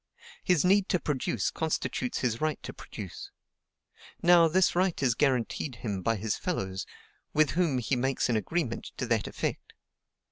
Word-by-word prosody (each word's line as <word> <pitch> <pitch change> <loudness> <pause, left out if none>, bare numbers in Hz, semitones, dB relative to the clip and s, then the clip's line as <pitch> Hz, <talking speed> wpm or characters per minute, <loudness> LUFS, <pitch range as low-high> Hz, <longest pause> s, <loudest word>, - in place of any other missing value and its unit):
His 180 -2 +3
need 195 +1 +4
to 180 - +2
produce 130 - -1
constitutes 155 -5 -2
his 120 -3 -1
right 155 -1 0
to - - -6
produce. - - -8 0.9
Now, 170 -1 +7
this 180 +3 +3
right 180 -1 +1
is 125 -3 +4
guaranteed 130 0 0
him 105 -5 -4
by 115 +5 +1
his 105 +1 -2
fellows, 95 - -3 0.5
with 155 0 +4
whom 165 -5 +1
he 125 +2 0
makes 130 +1 0
an 120 - +1
agreement 125 +2 -1
to - - -2
that 115 -3 0
effect. - - -4
135 Hz, 155 wpm, -29 LUFS, 115-170 Hz, 0.9 s, Now